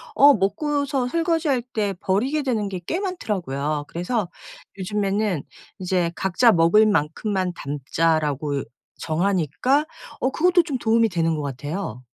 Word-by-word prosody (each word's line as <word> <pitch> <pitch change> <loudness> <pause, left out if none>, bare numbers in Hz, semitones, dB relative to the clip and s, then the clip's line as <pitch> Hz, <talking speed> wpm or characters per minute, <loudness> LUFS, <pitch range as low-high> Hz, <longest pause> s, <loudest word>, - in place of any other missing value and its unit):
어 285 +1 +8
먹고서 270 +6 0
설거지할 325 -5 +1
때 215 -5 -2
버리게 260 +11 0
되는 220 -6 -1
게 195 - -6
꽤 345 - -1
많더라고요. 155 - -2
그래서 180 +3 -2 0.5
요즘에는 200 -3 -1 0.4
이제 180 -2 0
'각자 195 +6 +3
먹을 170 +6 +5
만큼만 190 +1 0
담자.'라고 145 0 -1
이 - - -6 0.4
정하니까 190 - +1 0.4
어 260 - +2
그것도 355 +3 +3
좀 290 -6 -3
도움이 230 0 +3
되는 165 -2 0
것 150 - -3
같아요. 140 - -5
200 Hz, 295 characters per minute, -23 LUFS, 165-255 Hz, 0.5 s, 어